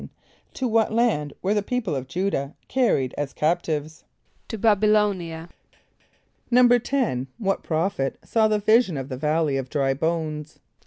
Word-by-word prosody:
= - - -35
To 260 - -1
what 225 -1 +2
land 215 -11 +1
were 195 +3 +2
the 210 - +1
people 220 -4 -2
of 130 -1 -4
J[=u]´dah 160 -2 -2
carried 230 - +1
as 145 -2 -3
captives? 155 -1 -1 0.4
=To 225 - -5
B[)a]b 215 0 +4
[)y] 210 - +5
l[=o]´n[)i] 200 -5 +1
a.= 170 - -15 1.0
=10.= 245 - +3
What 195 -3 -1
prophet 160 -4 -1
saw 220 -1 +2
the 215 0 +2
vision 215 - +3
of 135 0 -5
the 130 - -5
valley 150 0 +1
of 130 -1 -4
dry 135 -3 +1
bones? 155 0 -3
170 Hz, 160 wpm, -24 LUFS, 145-220 Hz, 1.0 s, y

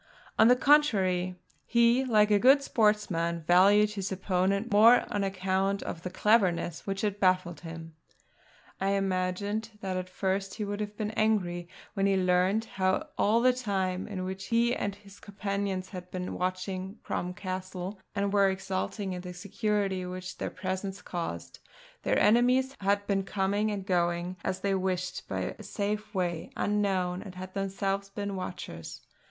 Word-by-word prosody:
On 220 - +8
the 250 - +7
contrary, 195 -11 +3 0.3
he, 235 +2 +3
like 215 -4 +3
a 205 - +5
good 270 +5 +6
sportsman, 190 -9 +1
valued 200 +5 +5
his 200 -2 -4
opponent 190 +3 0
more 225 +4 +7
on 205 -1 0
account 195 +1 0
of 165 - -5
the 180 - -4
cleverness 185 -4 +1
which 195 0 -2
had 205 -1 -1
baffled 185 -3 +2
him. 165 -1 -9 0.9
I 195 +1 +1
imagined 200 +3 -1
that 190 -1 -2
at 185 0 -4
first 190 +1 -2
he 215 - -3
would 205 0 -4
have 210 0 -5
been 215 -1 -2
angry 185 -6 0 0.3
when 195 -1 +1
he 195 -1 +3
learned 185 +4 +2
how 190 +9 -1
all 220 +3 +3
the 255 +1 +5
time 190 -6 -2
in 190 -3 -4
which 190 +1 -5
he 235 +1 +2
and 200 -1 -2
his 200 -1 -16
companions 200 -2 -3
had 180 -2 -8
been 180 0 -4
watching 185 +2 -3
Crom 180 +1 -3
Castle, 185 +1 -5 0.2
and 200 0 0
were 200 -1 +5
exulting 190 +1 -3
in 180 - -5
the 180 0 -8
security 200 0 -1
which 185 0 -6
their - - -2
presence 190 +1 -4
caused, 175 -2 -5 0.4
their - - +1
enemies 250 +4 +4
had 200 +1 +1
been 200 -1 +1
coming 200 +2 0
and 200 -2 -3
going 175 -1 0
as 185 0 -2
they 200 0 +1
wished 185 -1 -2
by - - -3
a - - -8
safe 210 0 -3
way, 175 -3 -1
unknown; 190 -3 0
and 195 -3 -10
had 185 0 -8
themselves 195 0 -2
been 200 0 -4
the - - -4
watchers. 180 - -6
195 Hz, 165 wpm, -29 LUFS, 185-210 Hz, 0.9 s, On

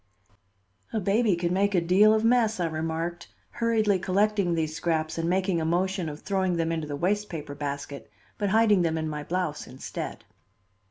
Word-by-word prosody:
"A 220 - +1
baby 205 +1 +2
can 175 0 -1
make 200 +1 +2
a - - +5
deal 185 +5 +5
of 220 0 +2
mess," 230 -3 +3
I 175 - +1
remarked, 165 +2 -3 0.2
hurriedly 220 -4 +1
collecting 195 -1 +1
these 155 -1 -1
scraps 160 -1 -1
and 165 +1 0
making 185 -2 +1
a - - -1
motion 180 +1 0
of 150 0 -8
throwing 190 -3 0
them 165 0 0
into 160 -2 -2
the 145 - -4
waste 205 +7 0
paper 150 -3 -6
basket, 140 -3 -5 0.3
but 205 - 0
hiding 215 -2 +4
them 165 -1 0
in 160 0 -2
my 150 -1 -4
blouse 175 -2 -3
instead. 130 - -6
175 Hz, 180 wpm, -27 LUFS, 160-200 Hz, 0.3 s, a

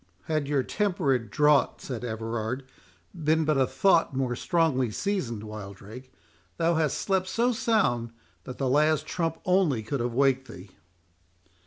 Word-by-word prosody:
"Had 155 -3 -1
your 140 -2 +1
temperate 145 - 0
draught," 150 +3 +3
said 125 -3 -6
Everard, 115 +2 -3 0.5
"been 160 0 +1
but 150 -2 +2
a 130 - +3
thought 170 -7 +2
more 130 -2 -1
strongly 150 -5 +1
seasoned, 120 - -2
Wildrake, 105 +4 -9 0.5
thou 165 +1 +2
hadst 160 -2 +1
slept 190 -2 0
so 235 +5 +1
sound 205 - +1 0.4
that 125 - -7
the 135 - -1
last 150 +3 +2
trump 165 -2 -2
only 180 - +2
could 135 +6 -3
have 120 0 -2
waked 135 0 +2
thee." 90 -3 -11
135 Hz, 145 wpm, -27 LUFS, 120-165 Hz, 0.5 s, draught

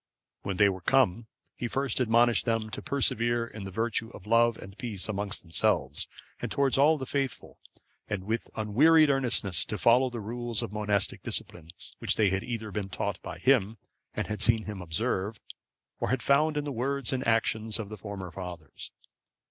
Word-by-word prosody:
When 95 -2 -3
they 105 - +6
were 95 -2 -2
come, 115 0 +2 0.3
he 120 - -3
first 135 +3 -1
admonished 120 -1 +4
them 115 -1 0
to - - -5
preserve 140 -5 +1
the 115 -4 -2
virtue 115 +2 -1
of 105 - -12
love 115 +1 +3
and 95 0 -11
peace 105 -5 -2
among 100 -1 -2
themselves, 85 -5 +1 0.3
and - - -4
towards 140 -2 +2
all 150 +3 +5
the 135 - -5
faithful; 135 -2 -3 0.5
and 100 -3 -2
with 110 +4 -2
unwearied 145 +9 +5
earnestness 120 -9 +2
to 105 - -4
follow 125 +4 +4
the 120 -1 -6
rules 120 +1 -3
of 110 -3 -6
monastic 105 -2 0
discipline, 80 -2 -4 0.3
which - - +1
they 105 -4 +3
had 95 0 -1
either 110 -3 -5
been 100 0 -3
taught 100 +2 -3
by - - -7
him, 115 -5 +2 0.4
and - - -1
had 105 -2 -4
seen 115 0 +3
him 105 -3 -6
observe, 95 +4 -2 0.6
or - - -1
had 130 - 0
found 150 +2 +3
in 145 - 0
the 145 - -3
words 135 +1 -2
and 130 -2 -2
actions 110 -1 +1
of 110 -3 -5
the 110 - -6
former 95 -3 -7
fathers. 90 -3 -8
110 Hz, 180 wpm, -28 LUFS, 100-125 Hz, 0.6 s, they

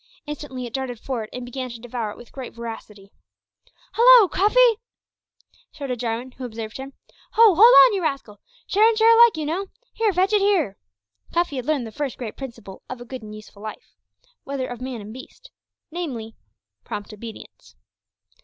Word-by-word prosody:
Instantly 290 -4 -6
it 235 - -9
darted 260 -4 -4
forward 230 -4 -4
and 250 0 -6
began 255 +1 -5
to 235 -1 -9
devour 235 -2 -4
it 205 - -9
with 240 - -14
great 260 -4 -8
voracity. 215 -4 -9 0.8
"Halo! 475 -2 +8
Cuffy," 455 +5 +4 0.9
shouted 275 -5 -5
Jarwin, 235 +2 -3
who 255 - -11
observed 225 -2 -6
him; 270 +1 -8 0.4
"ho! 450 -3 +7
hold 340 - -5 0.3
on, - - +2
you 390 - -1
rascal! 275 -10 -3 0.3
share 425 +3 +4
and 450 - -1
share 455 +1 +6
alike, 470 -5 +6
you 310 - -3
know. 360 +6 -2 0.3
Here, 450 -2 +1
fetch 380 +3 +1
it 415 - +4
here!" 360 - +1 0.5
Cuffy 340 -5 0
had 255 - -5
learned 295 -6 0
the 220 - -8
first 275 +2 -4
great 230 -4 -6
principle 230 -7 -9
of 255 - -6
a 245 - -9
good 255 0 -8
and 215 -1 -9
useful 215 -1 -13
life 215 0 -9 0.5
whether 275 -2 -3
of 245 0 -8
man 255 -4 -5
or 210 - -9
beast 260 - -13 0.4
namely, 255 -10 -5 0.5
prompt 205 +1 -7
obedience. 220 +1 -12
260 Hz, 180 wpm, -23 LUFS, 230-350 Hz, 0.9 s, Halo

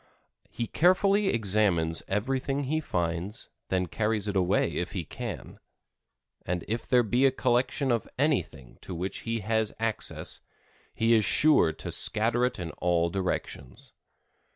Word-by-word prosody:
He 120 - -3
carefully 195 - +3
examines 100 - +2
everything 135 +7 -1
he 155 +4 0
finds, 85 - -3 0.2
then 90 -1 +1
carries 105 +3 -1
it 100 - -2
away 90 -2 +2
if - - -3
he - - -3
can. - - -7 0.8
And 90 -1 -3
if 115 +2 -3
there 125 -2 +4
be 125 +5 +3
a - - +2
collection 130 +1 +1
of 115 -2 0
anything 90 - -1
to 90 - -6
which 90 +3 -3
he 115 -1 -1
has 110 +1 0
access, 115 -1 -3 0.5
he 115 +1 +3
is 110 -2 +4
sure 125 - +4
to - - -7
scatter 115 +3 +2
it 125 - -2
in 85 -3 -5
all 85 -1 +1
directions. 90 -8 -3
110 Hz, 145 wpm, -28 LUFS, 90-130 Hz, 0.8 s, there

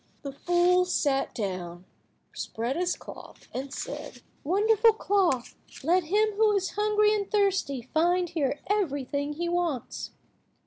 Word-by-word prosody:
The 280 - -4
fool 350 +5 +3
sat 285 -6 0
down, 185 -5 -4 0.5
spread 235 +4 -3
his 355 +1 0
cloth, - - -12
and 270 +1 -4
said— - - -7 0.2
"Wonderful 430 +6 +4
cloth, 380 - +1 0.3
let 350 +4 +3
him 425 +6 +2
who 435 -1 +4
is 385 -2 0
hungry 420 0 +2
and 405 -2 -2
thirsty 385 - +1
find 350 +3 +2
here 295 -4 -1
everything 285 -7 -1
he 345 +3 -3
wants." 340 -7 -2
350 Hz, 130 wpm, -27 LUFS, 280-400 Hz, 0.5 s, Wonderful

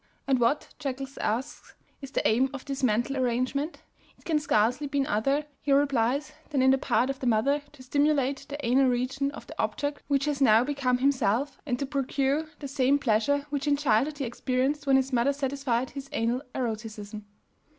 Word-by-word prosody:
And 265 -2 +2
what, 240 +5 +1
Jekels 275 -1 -5
asks, 235 +6 -3 0.3
is 275 - -7
the - - 0
aim 245 +5 +3
of 265 - -8
this 275 -1 -4
mental 240 +2 +1
arrangement? 255 +5 -1 0.3
It - - -25
can 315 -3 +2
scarcely 285 -1 +1
by 280 0 0
other, 275 +8 +1 0.2
he 285 - -1
replies, 275 0 +2 0.2
than 275 -4 +1
in 265 - +6
the 270 - +3
part 255 +1 +1
of 270 - -8
the 255 - -2
mother 265 +6 +2
to 270 -3 -14
stimulate 280 0 +1
the 285 - -4
anal 260 +3 +4
region 260 +3 0
of - - -10
the - - -10
object 290 0 -2
which 280 -1 +1
has 290 -2 -2
now 225 -3 +6
become 265 -2 0
himself, 265 0 +1
and 250 -3 0
to 275 - -2
procure 275 +2 0
the 285 - -6
same 275 0 +2
pleasure 280 +2 +1
which 285 0 -2
in 285 -1 +3
childhood 285 +2 +1
he 280 - -3
experienced 260 +4 -1
when 270 - +5
his 265 0 +1
mother 250 +3 +3
satisfied 270 -3 -1
his 275 -1 -8
anal 235 +3 0
eroticism. 215 -3 -5
270 Hz, 190 wpm, -27 LUFS, 245-285 Hz, 0.3 s, in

